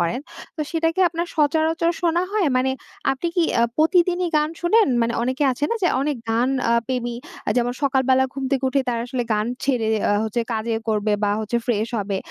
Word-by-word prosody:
করেন, 175 +8 0 0.4
তো - - -4
সেটা 325 -1 +1
কি 375 - -1
আপনার 340 +1 -3
সচরাচর 320 +2 +2
শোনা 340 0 +2
হয়? 420 -5 +2
মানে 260 +1 +2 0.4
আপনি 270 +6 -3
কি 345 - +4 0.2
আ - - +4
প্রতিদিনই 350 +2 +3
গান 300 0 +2
শোনেন? 425 +4 +4
মানে 230 0 0
অনেকে 260 +4 -1
আছে 270 +4 -2
না - - +1
যে 355 - +4
অনেক 290 0 -1
গান 235 +3 +2 0.2
আ - - +4
প্রেমী 245 -2 -2 0.3
আ - - +2
যেমন 245 0 +1
সকালবেলা 265 -1 +3
ঘুম 275 -1 -5
থেকে 275 -1 0
উঠে 275 +1 +1
তারা 235 -1 0
আসলে 250 0 -2
গান 210 0 0 0.2
ছেড়ে 250 -5 +1 0.2
আ - - +3
হচ্ছে 220 +2 -1
কাজে 225 +1 -1
করবে 215 -1 +1
বা 205 - +2
হচ্ছে 220 +2 -2
ফ্রেশ 225 -2 0
হবে। 200 -1 -2
265 Hz, 205 wpm, -22 LUFS, 235-325 Hz, 0.4 s, কি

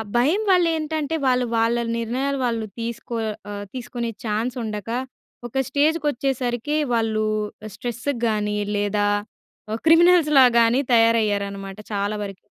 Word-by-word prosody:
భయం 295 - +3
వాళ్ళు 360 -2 +5
ఏంటంటే 315 0 -2
వాళ్ళు 250 -1 +3
వాళ్ళ 230 +1 +2 0.2
నిర్ణయాలు 260 +5 -1
వాళ్ళు 230 -2 -1
తీసుకో 235 +1 -5 0.4
ఆహ్, 205 0 -5
తీసుకునే 240 -2 -4 0.2
ఛాన్స్ 225 +4 -1
ఉండక 210 -1 -5 0.6
ఒక 265 +3 -2
స్టేజ్‌కి 300 +2 +1
వచ్చేసరికి 255 +1 -2 0.2
వాళ్ళు 220 -1 +1 0.5
స్ట్రెస్ 240 +4 -6 0.2
గాని 210 -1 0 0.2
లేదా 205 0 0 0.7
ఆ - - 0
క్రిమినల్‌స్ 335 0 +6
లాగా‌న్ని 240 0 +5
తయారయ్యారనమాట 205 -4 +2
చాలా 205 +1 -1
వరకు. 195 -1 -9
235 Hz, 120 wpm, -23 LUFS, 215-275 Hz, 0.7 s, క్రిమినల్‌స్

